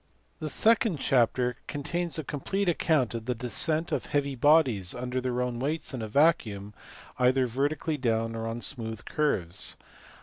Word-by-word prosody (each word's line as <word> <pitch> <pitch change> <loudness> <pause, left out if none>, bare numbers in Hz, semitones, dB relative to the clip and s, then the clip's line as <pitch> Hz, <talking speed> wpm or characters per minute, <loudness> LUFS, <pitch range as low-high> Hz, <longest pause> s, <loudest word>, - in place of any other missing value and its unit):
The 155 - -3
second 225 - +3
chapter 125 -2 +2
contains 165 +4 -3
a 155 - -3
complete 185 +8 -2
account 155 -7 +2
of 115 -1 -5
the 125 0 -1
descent 155 +7 0
of - - -1
heavy 140 -1 0
bodies 130 - +3
under 125 +1 -3
their 125 -1 -1
own 125 -1 -3
weights 150 +3 -2
in 125 - -4
a 110 - -3
vacuum, 105 -7 +2 0.5
either 130 +1 +4
vertically 145 +5 -1
down 115 -3 0
or 115 0 -3
on 115 +1 -4
smooth 110 -5 -3
curves. 100 - -1
130 Hz, 160 wpm, -28 LUFS, 115-155 Hz, 0.5 s, either